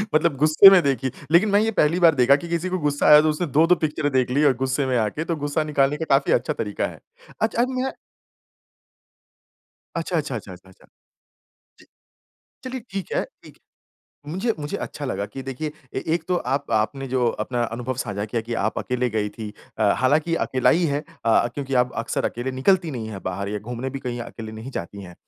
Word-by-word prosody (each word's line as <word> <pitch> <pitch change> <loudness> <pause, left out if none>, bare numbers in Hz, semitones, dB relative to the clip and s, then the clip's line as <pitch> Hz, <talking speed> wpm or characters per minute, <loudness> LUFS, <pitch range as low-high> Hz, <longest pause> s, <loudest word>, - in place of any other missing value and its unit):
मतलब 155 -1 +3
गुस्से 155 +7 +8
में 190 -2 +6
देखी 135 -2 0 0.2
लेकिन 180 +6 +5
मैं 200 0 +4
ये 220 +1 +1
पहली 170 -4 +2
बार 165 -3 +6
देखा 130 +1 +5
कि 145 +4 -5
किसी 170 +2 -1
को 185 - -1
गुस्सा 145 -2 0
आया 150 0 +9
तो 155 - +2
उसने 155 +3 -1
2-2 160 +5 +4
पिक्चरें 150 -3 -1
देख 130 -2 +1
ली 140 +4 +2
और 140 - +5
गुस्से 130 +2 0
में 130 -1 +1
आके 110 +7 -1
तो 170 - -1
गुस्सा 145 +1 -1
निकालने 145 -1 +1
का 160 - -3
काफ़ी 135 0 +3
अच्छा 120 - +1
तरीका 105 -2 -2
है। - - -11 0.4
अच्छा 225 +1 +1
अम, 255 0 -2
या 265 - -1 2.0
अच्छा, 165 +1 -1
अच्छा, 145 -5 -2
अच्छा, 105 -4 -7
अच्छा, 90 +1 -16
अच्छा। 95 - -21 0.9
जी। - - -18 0.8
चलिए, 260 0 -5
ठीक 195 -1 -5
है, - - +1 0.2
ठीक - - -15 0.7
मुझे 190 +10 -1
मुझे 145 0 -3
अच्छा 145 - -6
लगा 130 -6 -2
कि 130 +6 -8
देखिए 135 +4 -4 0.2
ए 130 - -2
एक 170 - -2
तो 180 - +2 0.2
आप 140 0 -3
आपने 115 +5 0
जो 125 -1 +1 0.2
अपना 120 +2 -2
अनुभव 125 +2 -3
साझा 100 -2 -4
किया 115 +2 -2
कि 120 - -2
आप 110 - -1
अकेले 125 0 -1
गई 105 -1 -1
थी 110 +1 -8 0.3
अ, - - 0
हालाँकि 150 +6 +2
अकेला 130 -1 +2
ही 175 +2 +2
है 145 -1 0 0.3
अ, 115 0 +4
क्योंकि 135 -1 -3
आप 125 - -7
अक्सर 115 - -2
अकेले 120 +3 -2
निकलती 170 +6 +2
नहीं 115 -5 -5
है 100 - -6
बाहर 100 +2 -4
या 105 +1 -3
घूमने 120 +5 -5
भी 135 - -5
कहीं 120 -2 -5
अकेले 115 -2 -8
नहीं 110 +4 -8
जाती 100 -3 -6
हैं। 90 -2 -11
135 Hz, 210 wpm, -23 LUFS, 120-160 Hz, 2.0 s, आया